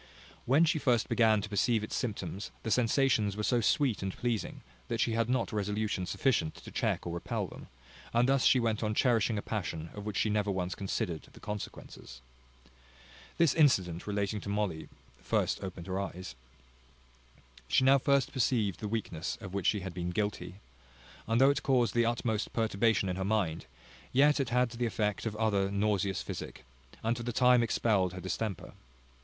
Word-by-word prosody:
When 145 +7 +5
she 155 -1 +1
first 120 -5 +2
began 110 -3 +4
to 105 - -5
perceive 105 +2 +1
its 110 - -4
symptoms, 100 -4 -4
the 110 - -3
sensations 115 -3 +2
were 105 - -2
so 120 +2 +2
sweet 125 +1 +2
and 95 -1 -2
pleasing, 120 -3 -2 0.3
that - - -2
she - - +2
had 115 +1 0
not 125 -3 0
resolution 105 -2 -1
sufficient 125 - 0
to - - -11
check - - -1
or 85 - -4
repel 85 - -3
them; - - -11 0.4
and 120 +2 +3
thus 135 0 +3
she 130 - +5
went 115 -2 0
on 105 -1 -1
cherishing 115 -3 +2
a 100 - -3
passion 85 -6 -4
of 105 - -7
which 105 -1 -4
she 110 - +2
never 105 -1 0
once 90 -1 -1
considered 90 -4 -3
the - - -14
consequences. 100 -10 -8 1.2
This 165 -5 +4
incident 95 - +2
relating 100 0 -1
to 100 - -6
Molly 100 -6 -2 0.3
first - - 0
opened 90 -3 -6
her 95 0 -2
eyes. 95 -4 -6 1.3
She 130 - +3
now 135 +1 +6
first 140 +1 +2
perceived 115 - +1
the 105 - -4
weakness 100 -6 -3
of 95 -2 -9
which 100 -3 -1
she 105 - +2
had 95 -1 -6
been 90 0 -3
guilty; 95 -2 -3 0.7
and 115 +1 +2
though 135 +1 +6
it 140 - -2
caused 125 -3 +2
the 120 -1 +3
utmost 115 -2 -1
perturbation 110 -2 +1
in 90 0 -2
her 95 - -2
mind, 95 -8 -1 0.4
yet 145 +3 +4
it 135 -4 0
had 125 0 +2
the 120 0 -1
effect 105 0 -1
of 105 - -4
other 105 -3 +1
nauseous 100 -2 0
physic, - - -7 0.4
and 115 +1 +1
for 120 - -6
the 120 +1 -3
time 125 +1 +5
expelled 105 -5 +1
her 95 - -6
distemper. 95 +1 -4
105 Hz, 185 wpm, -31 LUFS, 95-120 Hz, 1.3 s, now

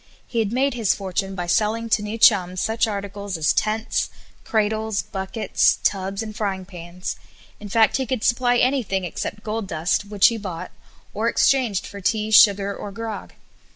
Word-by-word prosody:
He 235 - -3
had 215 -2 0
made 265 +3 +1
his 230 -5 +1
fortune 195 0 -3
by 175 -2 -3
selling 220 +5 +1
to 215 -1 +2
new 210 +2 -4
chums 185 -5 +4
such 225 +3 +1
articles 200 -2 -4
as 155 -1 +2
tents, 220 +2 0 0.3
cradles, 220 -1 0
buckets, 195 +3 0
tubs, 195 +1 -1
and 215 -1 -8
frying 195 -3 -2
pans; 180 -1 -7 0.4
in 210 - -9
fact 220 +2 +3
he 265 -2 -2
could 245 -2 -2
supply 245 0 +2
anything 240 -8 +1
except 180 +4 -5
gold 215 -1 -3
dust, 165 +4 0
which 205 -1 +4
he 230 -1 -4
bought, 185 -3 -6 0.4
or 220 +3 0
exchanged 235 -7 +2
for 200 - -9
tea, 215 +2 0
sugar, 200 -2 +5
or 205 - -7
grog. 220 +1 -6
210 Hz, 170 wpm, -22 LUFS, 195-225 Hz, 0.4 s, sugar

